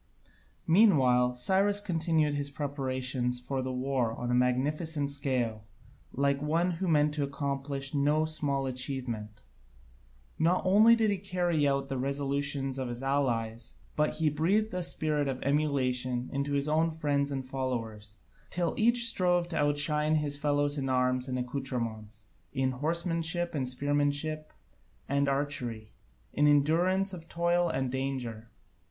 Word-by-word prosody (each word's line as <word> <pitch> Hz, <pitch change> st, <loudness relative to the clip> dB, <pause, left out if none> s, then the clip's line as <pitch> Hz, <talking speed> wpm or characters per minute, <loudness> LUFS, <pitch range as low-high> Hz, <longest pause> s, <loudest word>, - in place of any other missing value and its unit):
Meanwhile 130 Hz, -, +4 dB
Cyrus 195 Hz, +10 st, +2 dB
continued 160 Hz, -5 st, 0 dB
his 145 Hz, 0 st, -2 dB
preparations 130 Hz, -3 st, -3 dB
for 130 Hz, +2 st, -3 dB
the 130 Hz, 0 st, -3 dB
war 125 Hz, -2 st, -1 dB
on 120 Hz, 0 st, -3 dB
a -, -, +1 dB
magnificent 140 Hz, +4 st, 0 dB
scale, 125 Hz, -6 st, -2 dB, 0.5 s
like 140 Hz, 0 st, 0 dB
one 165 Hz, +4 st, +1 dB
who 180 Hz, +2 st, -3 dB
meant 150 Hz, -2 st, +3 dB
to 150 Hz, -1 st, -1 dB
accomplish 140 Hz, 0 st, -3 dB
no 150 Hz, +2 st, +2 dB
small 145 Hz, -3 st, 0 dB
achievement. 125 Hz, -5 st, -4 dB, 1.0 s
Not 170 Hz, +3 st, +2 dB
only 215 Hz, +5 st, +6 dB
did 220 Hz, -2 st, +1 dB
he 200 Hz, -, -2 dB
carry 175 Hz, -6 st, 0 dB
out 140 Hz, 0 st, +1 dB
all -, -, -13 dB
the 135 Hz, -2 st, -4 dB
resolutions 140 Hz, 0 st, -2 dB
of 130 Hz, -, -2 dB
the 135 Hz, -, -6 dB
allies, 120 Hz, -5 st, -1 dB, 0.2 s
but 150 Hz, 0 st, +1 dB
he 155 Hz, -1 st, +1 dB
breathed 190 Hz, +9 st, +1 dB
a 180 Hz, -, -2 dB
spirit 155 Hz, -4 st, 0 dB
of 130 Hz, -1 st, -3 dB
emulation 130 Hz, -4 st, 0 dB
into 140 Hz, +1 st, -2 dB
his 140 Hz, +1 st, 0 dB
own 160 Hz, +2 st, +2 dB
friends 145 Hz, -3 st, -1 dB
and 135 Hz, -2 st, -4 dB
followers, 115 Hz, -6 st, -4 dB, 0.3 s
till 175 Hz, -2 st, -1 dB
each 235 Hz, +2 st, +6 dB
strove 180 Hz, -5 st, +2 dB
to 165 Hz, -, -3 dB
outshine 150 Hz, +1 st, +3 dB
his 150 Hz, -2 st, -1 dB
fellows 145 Hz, 0 st, 0 dB
in 135 Hz, -1 st, -2 dB
arms 125 Hz, 0 st, +1 dB
and 130 Hz, -1 st, -2 dB
accoutrements, 115 Hz, -5 st, -4 dB, 0.3 s
in 130 Hz, 0 st, 0 dB
horsemanship 165 Hz, +4 st, -1 dB
and 135 Hz, -4 st, -2 dB
spearmanship 145 Hz, +3 st, 0 dB, 0.6 s
and 140 Hz, 0 st, +1 dB
archery, 130 Hz, -6 st, -3 dB, 0.4 s
in 150 Hz, -, +3 dB
endurance 175 Hz, +7 st, +2 dB
of 165 Hz, -2 st, -9 dB
toil 170 Hz, 0 st, +1 dB
and 130 Hz, -1 st, -2 dB
danger. 125 Hz, -4 st, -4 dB
140 Hz, 145 wpm, -29 LUFS, 130-160 Hz, 1.0 s, only